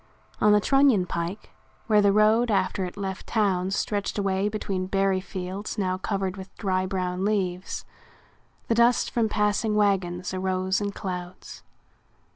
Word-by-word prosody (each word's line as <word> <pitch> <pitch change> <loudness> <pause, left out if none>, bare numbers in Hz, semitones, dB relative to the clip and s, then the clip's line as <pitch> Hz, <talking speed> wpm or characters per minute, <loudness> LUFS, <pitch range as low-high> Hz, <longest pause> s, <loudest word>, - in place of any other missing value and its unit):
On 210 - +5
the 210 - +6
Trunion 270 -5 +4
Pike, 170 +4 -4 0.3
where 210 -2 +4
the 200 -1 +4
road 215 +3 +4
after 190 -2 +1
it 180 +2 -8
left 195 -1 -5
town 190 -4 +1
stretched 200 +1 -2
away 195 0 0
between 195 -3 -3
berry 195 -1 +1
fields 190 +2 -6
now 185 -2 -1
covered 195 -1 -2
with 190 0 -11
dry 185 -2 0
brown 185 -1 -2
leaves, 190 -3 -2 0.8
the - - +2
dust 235 +1 +3
from 230 -2 +1
passing 210 +1 +1
wagons 185 -3 0
arose 185 +1 0
in 205 - -1
clouds. 180 -2 -7
195 Hz, 145 wpm, -26 LUFS, 185-210 Hz, 0.8 s, the